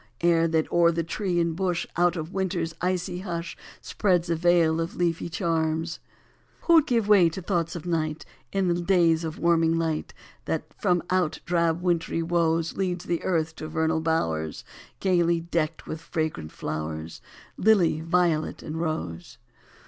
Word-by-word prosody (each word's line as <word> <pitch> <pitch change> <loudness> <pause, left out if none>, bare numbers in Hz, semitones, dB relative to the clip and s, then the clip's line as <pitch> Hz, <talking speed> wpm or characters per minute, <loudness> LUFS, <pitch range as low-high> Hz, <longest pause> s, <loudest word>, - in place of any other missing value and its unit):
Air 165 -1 +4
that 160 -1 +1
o 175 0 +4
er 170 - +6
the 165 0 -1
tree 175 +2 -1
and 170 -1 0
bush 180 -2 -1
Out 175 +1 +3
of 160 +1 -5
winter 190 -2 -1
s 165 0 -4
icy 180 0 -1
hush 170 -3 -5 0.3
Spreads 180 -4 0
a - - +2
veil 165 -1 +3
of 165 - -4
leafy 170 -1 -1
charms? 165 -1 -1 0.6
Who 335 -2 +6
d 300 - -13
give 230 -5 +1
way 195 -5 +6
to 165 - -6
thoughts 175 -3 -1
of 170 - -6
night 160 -2 -2 0.3
In 195 -1 +1
the 175 0 +1
days 170 -3 +3
of 160 -1 -4
warming 165 -1 +3
light 160 -2 -2 0.3
That - - -1
from 180 -5 +1
out 185 -4 +1
drab 170 0 +1
wintry 165 -2 0
woes 165 -1 +1
Leads 180 -2 -2
the 170 -1 -1
earth 160 -3 0
to 155 - -6
vernal 160 0 0
bowers 80 - -1 0.4
Gaily 170 -3 +2
decked 165 -1 -2
with 155 - -6
fragrant 155 - -3
flowers 80 +1 -5 0.3
Lily, 185 -7 +3
violet, 165 -2 +1
and 160 +2 -4
rose? 90 - -4
170 Hz, 165 wpm, -26 LUFS, 160-175 Hz, 0.6 s, er